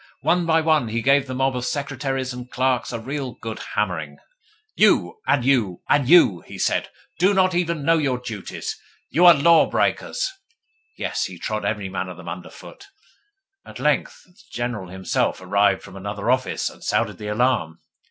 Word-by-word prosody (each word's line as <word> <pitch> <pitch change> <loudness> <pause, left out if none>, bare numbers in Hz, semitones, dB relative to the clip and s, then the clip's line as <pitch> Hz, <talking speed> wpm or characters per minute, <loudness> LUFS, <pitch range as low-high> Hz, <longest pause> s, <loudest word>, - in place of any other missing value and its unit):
One 175 -1 +1
by 160 0 +3
one, 155 -5 +2
he 115 +1 -2
gave 140 0 +3
the 130 - -5
mob 135 0 +1
of 125 - -3
secretaries 135 -2 -3
and 125 0 -8
clerks 130 -1 0
a 120 - -4
real 135 +1 -4
good 110 -1 -7 0.2
hammering. - - -2 0.6
'You, 445 - +3
and 125 -4 +2
you, 115 -10 +1
and 140 -3 +3
you,' 165 - +6
he - - -11
said, - - 0 0.3
'do 195 +3 +4
not 185 -1 +3
even 170 -4 -1
know 165 +1 +4
your 135 -4 0
duties. 115 -5 -6 0.3
You 175 +4 +5
are 170 - +9
law 165 +3 +5
breakers.' 385 - 0 0.7
Yes, - - -2
he 90 - -8
trod 110 +5 -3
every 105 -2 -2
man 95 0 -4
of 90 - -9
them 90 -2 -8
under 85 +1 -7
foot. 405 - -13 0.8
At - - -11
length - - 0
the 180 - -27 0.2
General 120 -5 -4
himself 95 -1 -1
arrived 100 +1 +2
from - - -12
another 100 +4 -2
office, 130 0 0
and - - -9
sounded - - -1
the 105 - -6
alarm. 105 -8 0
125 Hz, 180 wpm, -22 LUFS, 105-145 Hz, 0.8 s, are